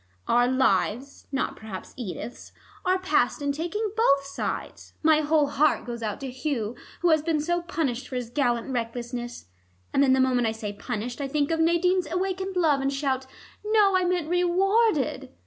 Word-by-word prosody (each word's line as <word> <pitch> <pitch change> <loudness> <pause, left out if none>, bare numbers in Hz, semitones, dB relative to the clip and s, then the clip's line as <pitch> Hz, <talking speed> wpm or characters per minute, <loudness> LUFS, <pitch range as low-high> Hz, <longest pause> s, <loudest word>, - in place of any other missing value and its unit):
Our 245 +1 +4
lives 260 +1 0
not 270 - -1
perhaps 210 -4 -8
Edith's 240 +1 -7 0.3
are 370 0 +2
passed 370 -3 +1
in 285 -1 0
taking 350 +8 -2
both 280 -12 +3
sides. 275 - -5
My 310 0 +5
whole 305 0 +3
heart 295 +2 +2
goes 240 -1 -5
out 215 -2 -3
to 270 -2 -4
Hugh, 250 -4 -2 0.3
who 350 -1 +4
has 310 -1 +4
been 315 -1 0
so 345 +3 0
punished 290 -8 -2
for 260 - -7
his 245 -2 -4
gallant 245 -2 0
recklessness, 240 0 -4 0.5
and - - +3
then 265 -2 +5
the 265 - +3
moment 250 -2 +3
I 220 - 0
say 215 -2 -5
'punished' 230 +6 -5
I 275 - -1
think 285 +2 0
of 325 - 0
Nadine's 345 +2 +2
awakened 380 +1 -2
love 310 -6 +3
and 270 0 0
shout, 270 -2 -1 0.4
'No, 420 -2 +4
I 370 - +3
meant 355 -3 0
rewarded.' 360 - +2
280 Hz, 180 wpm, -26 LUFS, 245-345 Hz, 0.5 s, My